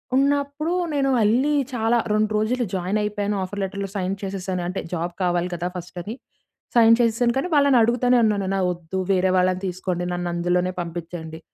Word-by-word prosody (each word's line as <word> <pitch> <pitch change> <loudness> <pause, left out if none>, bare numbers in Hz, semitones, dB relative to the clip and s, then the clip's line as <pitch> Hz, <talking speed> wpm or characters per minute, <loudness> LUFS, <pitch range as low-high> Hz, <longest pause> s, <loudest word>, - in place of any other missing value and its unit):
ఉన్నప్పుడు 285 +4 +1 0.2
నేను 275 -2 +1
ఎళ్లి 255 +8 +3 0.2
చాలా 230 0 +2 0.2
2 215 0 +1
రోజులు 235 +3 0
జాయినైపోయాను. 205 +2 -1
ఆఫర్ 200 +2 -5
లెటర్‌లో 195 0 -4
సైన్ 190 0 -1
చేసేసాను, 190 -2 -3
అంటే 185 - -3
జాబ్ 175 0 -2
కావాలి 175 0 +1
కదా! 175 +1 -3
ఫస్ట్ 180 +1 -9
అది 220 +5 -6 0.6
సైన్ 230 -1 +7
చేసేసాను. 235 +1 +2
కానీ 355 - -1
వాళ్ళని 280 -3 +5
అడుగుతూనే 245 +2 +3
ఉన్నాను 205 -3 0
"నా 195 - 0
వద్దు 175 +1 -5
వేరే 185 0 +2
వాళ్ళని 185 0 +2
తీసుకోండి. 180 -1 -3
నన్ను 175 0 -2
అందులోనే 180 +1 0
పంపించండి. 165 -1 -7
195 Hz, 160 wpm, -23 LUFS, 180-235 Hz, 0.6 s, సైన్